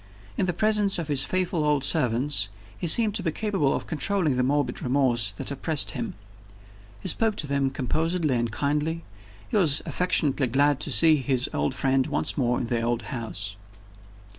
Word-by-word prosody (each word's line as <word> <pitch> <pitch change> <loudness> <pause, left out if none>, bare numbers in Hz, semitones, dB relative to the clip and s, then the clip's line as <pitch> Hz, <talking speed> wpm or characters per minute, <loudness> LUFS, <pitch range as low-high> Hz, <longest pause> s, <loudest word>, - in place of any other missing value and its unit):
In 185 - -1
the - - +2
presence 210 +2 +2
of 165 -3 -5
his 140 -2 +3
faithful 180 -3 -1
old 150 -2 +1
servants, 125 -6 +2 0.3
he 175 - -4
seemed 215 +5 +3
to 210 - -1
be 170 -3 -1
capable 195 -7 -1
of - - -4
controlling 160 -1 0
the 125 - +1
morbid 145 +3 -1
remorse 125 -5 +1
that 100 - -6
oppressed 140 +1 0
him. 220 -7 -5 0.9
He - - -6
spoke 220 +3 +2
to - - -2
them 140 -1 0
composedly 155 +4 -1
and 120 -1 -1
kindly; 150 +6 -2 0.4
he - - -1
was 160 -7 +4
affectionately 145 -6 0
glad 140 +3 +2
to - - -3
see 160 -2 +5
his 130 -1 -1
old 130 - -1
friend 135 0 +1
once 150 -1 0
more 125 -3 0
in - - -2
the 115 0 -1
old 120 0 -1
house. 105 -4 -5
145 Hz, 180 wpm, -25 LUFS, 130-170 Hz, 0.9 s, see